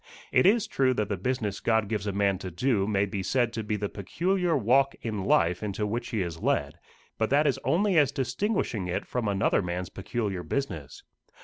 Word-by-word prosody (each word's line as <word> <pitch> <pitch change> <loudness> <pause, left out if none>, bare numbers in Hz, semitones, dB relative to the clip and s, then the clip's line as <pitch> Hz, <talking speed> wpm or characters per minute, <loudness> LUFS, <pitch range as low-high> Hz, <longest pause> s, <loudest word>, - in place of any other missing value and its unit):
It - - +5
is 220 +2 +4
true 130 -2 +1
that 105 -3 -1
the 100 - 0
business 105 0 -2
God 110 -2 +1
gives 105 -1 -2
a - - 0
man 100 -1 +1
to 95 - -5
do 100 +3 0
may 100 -2 +2
be 100 -1 -4
said 120 +3 +1
to 115 - -2
be 105 0 -1
the 105 0 -2
peculiar 175 - 0
walk 135 +4 +3
in 105 -4 -3
life 85 -2 +3
into 105 0 -2
which 120 +4 -3
he 110 -6 0
is 85 -2 -6
led, - - 0 0.4
but 110 - +1
that 145 +3 +3
is 140 -4 +1
only 175 - +3
as 145 -4 +3
distinguishing 130 - -1
it 90 - -2
from 125 -3 -2
another 100 0 +2
man's 90 0 -3
peculiar 100 -1 -3
business. 85 - -4
110 Hz, 205 wpm, -27 LUFS, 95-130 Hz, 0.4 s, It